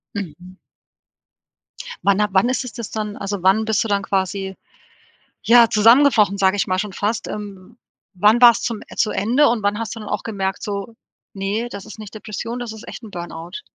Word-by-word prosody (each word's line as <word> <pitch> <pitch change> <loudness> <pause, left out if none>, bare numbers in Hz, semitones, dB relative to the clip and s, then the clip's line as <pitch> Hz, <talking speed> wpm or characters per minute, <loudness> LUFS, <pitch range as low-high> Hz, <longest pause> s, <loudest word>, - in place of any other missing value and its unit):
Mhm. 185 0 -7 1.4
Wann 200 +1 +2
ha 210 - +3
wann 195 +6 +3
ist 260 - -1
es 235 - -8
das 235 -3 -7
dann 210 -1 -4
also, 200 -2 -4
wann 195 +4 +4
bist 220 -1 +1
du - - -4
dann 200 -1 0
quasi, 190 0 -2 0.9
ja, 235 -1 +6
zusammengebrochen, 225 -2 +5
sage 190 0 +3
ich 200 - 0
mal 185 0 0
schon 210 +1 -3
fast? 215 +3 -2
Ähm, 205 +1 -8 0.4
wann 210 +6 +4
war's 235 -2 +7
zum 230 -3 -3 0.2
zu 215 - +2
Ende 245 +9 +3
und 230 -3 -1
wann 205 +1 0
hast 230 0 -4
du - - -8
dann 210 - -8
auch - - -2
gemerkt, 195 -3 -3
so: 205 +1 -5 0.4
„Ne, 205 +4 -2
das 200 - -8
ist - - -11
nicht 210 -2 -10
Depression, 230 +3 -5
das 235 -3 -5
ist 220 - -12
echt - - -9
'n 215 - -10
Burnout.“ 170 0 -7
210 Hz, 195 wpm, -20 LUFS, 195-225 Hz, 1.4 s, war's